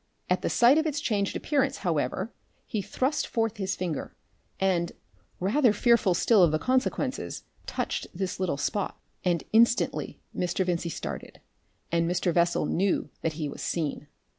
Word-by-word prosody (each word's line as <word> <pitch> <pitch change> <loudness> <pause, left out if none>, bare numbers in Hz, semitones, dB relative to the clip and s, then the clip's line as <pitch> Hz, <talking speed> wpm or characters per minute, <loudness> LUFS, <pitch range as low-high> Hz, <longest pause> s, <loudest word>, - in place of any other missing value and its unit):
At - - +3
the - - 0
sight 250 +6 +6
of 315 - +1
its 300 -1 -1
changed 205 -8 0
appearance, 275 -2 +1
however, - - -1 0.3
he 215 -5 -2
thrust 260 - -1
forth 225 -2 -1
his 190 -2 -1
finger, 170 -6 -4 0.4
and, 180 -3 +1 0.5
rather 220 +5 +3
fearful 215 -4 +3
still 215 +3 +4
of 170 -3 +6
the 155 - +2
consequences, 260 - -1 0.2
touched - - -2
this 185 0 -3
little 185 -6 0
spot. 200 +7 -2 0.2
And 175 -3 +1
instantly 235 +2 +3 0.2
Mr. 180 +1 0
Vincey 170 -1 -1
started, - - -6 0.5
and 170 0 +2
Mr. 175 0 +1
Bessel 170 -2 +2
knew 190 +5 0
that 160 - -1
he 155 -1 -3
was 140 - -7
seen. 150 -3 -2
190 Hz, 155 wpm, -28 LUFS, 170-235 Hz, 0.5 s, sight